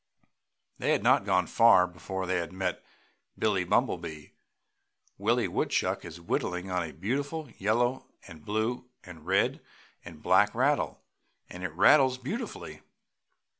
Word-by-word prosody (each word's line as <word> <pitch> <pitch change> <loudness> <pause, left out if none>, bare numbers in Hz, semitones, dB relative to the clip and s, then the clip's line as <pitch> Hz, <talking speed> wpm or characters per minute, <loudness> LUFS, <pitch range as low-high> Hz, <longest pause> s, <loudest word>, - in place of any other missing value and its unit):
They - - +1
had - - 0
not - - +4
gone 90 -1 +2
far 115 -5 +5
before 95 +1 -6
they 90 -2 -1
met 95 0 -3 0.5
Billie - - +1
Bumblebee. 75 -1 -1 0.9
"Willie - - +1
Woodchuck - - -1
is 85 0 -9
whittling 90 +2 -3
on 90 0 0
a 80 -2 -5
beautiful 140 - -3
yellow 120 +6 0 0.2
and 80 -5 -13
blue 110 +5 -2
and 85 -4 -13
red 95 +1 +1 0.4
and 80 -3 -12
black 105 +3 +3
rattle 140 +4 0 0.5
and 90 +1 -8
it 95 - -3
rattles 130 - +5
beautifully." 145 - -6
95 Hz, 130 wpm, -28 LUFS, 90-120 Hz, 0.9 s, far